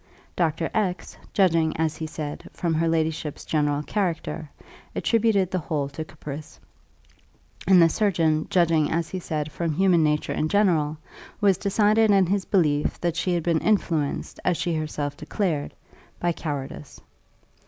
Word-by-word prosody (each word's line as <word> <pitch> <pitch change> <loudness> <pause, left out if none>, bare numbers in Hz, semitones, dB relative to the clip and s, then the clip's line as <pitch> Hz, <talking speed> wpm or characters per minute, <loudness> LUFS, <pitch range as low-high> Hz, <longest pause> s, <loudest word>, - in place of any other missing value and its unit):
Doctor 165 -1 0
X, 195 -4 -1 0.2
judging, 165 -5 +2
as 155 -1 0
he 160 - -4
said, 150 -1 -6
from 170 -2 -1
her 165 +1 +1
ladyship's 160 -2 -1
general 145 -1 0
character, 165 -5 -2 0.5
attributed 220 -5 +2
the 185 - 0
whole 150 -3 -2
to 160 +3 -5
caprice; 150 -1 -9 1.1
and 185 -1 +7
the 165 - +7
surgeon, 165 -4 +1
judging, 165 -5 +3
as 165 0 -1
he 185 - -4
said, 155 -3 -3
from 165 0 -2
human 180 0 +3
nature 150 0 0
in 155 - -1
general, 165 -7 +2 0.4
was 195 -3 +3
decided 215 +2 +3
in 195 -2 +5
his 190 +2 0
belief 150 -6 +1
that 170 -2 -1
she 175 +2 0
had 170 - -1
been 165 -1 +2
influenced, 165 -9 0
as 180 -2 +1
she 170 - -1
herself 150 -2 -3
declared, 160 -5 -2 0.5
by 175 - +1
cowardice. 145 -3 -6
165 Hz, 150 wpm, -25 LUFS, 155-185 Hz, 1.1 s, and